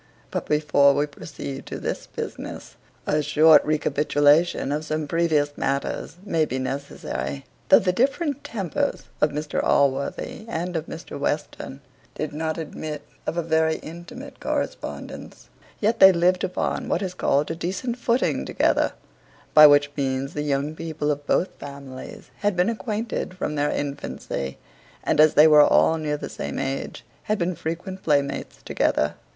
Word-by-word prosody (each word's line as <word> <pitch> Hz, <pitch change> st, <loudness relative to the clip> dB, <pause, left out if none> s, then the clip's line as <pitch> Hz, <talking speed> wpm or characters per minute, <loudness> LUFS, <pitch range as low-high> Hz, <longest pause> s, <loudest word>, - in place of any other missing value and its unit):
But -, -, -3 dB
before 145 Hz, -2 st, +4 dB
we 145 Hz, -, +2 dB
proceed 140 Hz, -2 st, -8 dB
to -, -, -5 dB
this -, -, -4 dB
business, -, -, -7 dB, 0.3 s
a 150 Hz, +1 st, +1 dB
short 150 Hz, +2 st, +6 dB
recapitulation 150 Hz, 0 st, +2 dB
of 150 Hz, +2 st, -1 dB
some 155 Hz, -1 st, -2 dB
previous 150 Hz, -3 st, +1 dB
matters 140 Hz, +4 st, -2 dB
may 165 Hz, -5 st, +1 dB
be 130 Hz, -4 st, -2 dB
necessary. 130 Hz, -, -4 dB, 0.2 s
Though -, -, +9 dB
the 185 Hz, -, +2 dB
different 280 Hz, -, 0 dB
tempers 230 Hz, -, -2 dB, 0.2 s
of 150 Hz, -, +4 dB
Mr 150 Hz, +1 st, -2 dB
Allworthy 140 Hz, +10 st, 0 dB
and 175 Hz, -1 st, -3 dB
of 160 Hz, 0 st, -2 dB
Mr 165 Hz, -, -8 dB
Western 145 Hz, -1 st, -3 dB, 0.3 s
did 155 Hz, -1 st, -4 dB
not 160 Hz, +1 st, -2 dB
admit 155 Hz, -2 st, -6 dB, 0.2 s
of 170 Hz, -, -2 dB
a 170 Hz, -, +1 dB
very 160 Hz, 0 st, +2 dB
intimate 170 Hz, +2 st, -10 dB
correspondence, -, -, -5 dB, 0.3 s
yet 225 Hz, +2 st, +1 dB
they 190 Hz, -, +10 dB
lived 180 Hz, +1 st, +2 dB
upon 180 Hz, -, -2 dB
what -, -, 0 dB
is 185 Hz, -1 st, -3 dB
called 145 Hz, -4 st, +1 dB
a -, -, -3 dB
decent 190 Hz, +9 st, -3 dB
footing 240 Hz, +1 st, +1 dB
together; -, -, +1 dB, 0.6 s
by 150 Hz, 0 st, +10 dB
which 145 Hz, 0 st, +4 dB
means 135 Hz, -1 st, -2 dB
the 150 Hz, -, -2 dB
young 145 Hz, +1 st, -1 dB
people 155 Hz, -2 st, -2 dB
of 145 Hz, 0 st, -4 dB
both 185 Hz, -, +2 dB
families 140 Hz, -2 st, -9 dB
had 205 Hz, -2 st, 0 dB
been 180 Hz, +4 st, +2 dB
acquainted 215 Hz, -4 st, -4 dB
from 150 Hz, -, -2 dB
their 145 Hz, 0 st, +1 dB
infancy; 140 Hz, -, -4 dB, 0.5 s
and -, -, +1 dB
as 155 Hz, 0 st, +6 dB
they 150 Hz, -, +8 dB
were 150 Hz, -1 st, +8 dB
all 160 Hz, +2 st, +4 dB
near 150 Hz, -1 st, -1 dB
of 145 Hz, -, -9 dB
the -, -, -4 dB
same -, -, -5 dB
age, 135 Hz, 0 st, -4 dB, 0.2 s
had 215 Hz, -, 0 dB
been 180 Hz, 0 st, 0 dB
frequent 175 Hz, +4 st, -5 dB
playmates 140 Hz, -2 st, -1 dB
together. -, -, +1 dB
155 Hz, 155 wpm, -24 LUFS, 145-175 Hz, 0.6 s, they